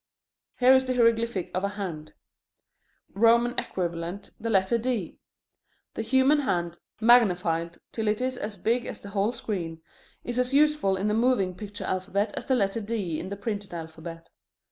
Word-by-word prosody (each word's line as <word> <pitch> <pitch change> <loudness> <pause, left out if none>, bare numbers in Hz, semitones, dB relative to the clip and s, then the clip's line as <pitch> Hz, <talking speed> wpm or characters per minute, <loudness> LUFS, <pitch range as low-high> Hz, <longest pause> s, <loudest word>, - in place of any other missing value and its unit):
Here 255 +1 +7
is 260 0 +4
the 255 0 -1
hieroglyphic 230 -4 +2
of 185 - -1
a 200 - +1
hand: 180 -7 -6 1.0
Roman 235 +3 +4
equivalent, 175 +1 -4
the 230 - -3
letter 195 +2 +2
D. 230 -7 -3 0.7
The - - -3
human 265 +5 +3
hand, 175 - -1 0.2
magnified 180 -8 +3
till 220 -2 -3
it 210 0 +1
is 255 +1 -1
as 210 -3 -5
big 230 +6 0
as - - -5
the 200 - -10
whole 200 +2 +1
screen, 170 -9 -5 0.4
is 240 +1 -3
as 250 +2 +1
useful 300 -10 +3
in 195 +2 -1
the 210 - +1
moving 220 -5 +2
picture 205 +1 -7
alphabet 200 +3 -1
as - - -5
the 265 - +3
letter 205 -1 0
D 200 -7 -2
in - - -6
the 200 - -5
printed 205 -3 -4
alphabet. 165 0 -8
205 Hz, 165 wpm, -27 LUFS, 185-235 Hz, 1.0 s, Here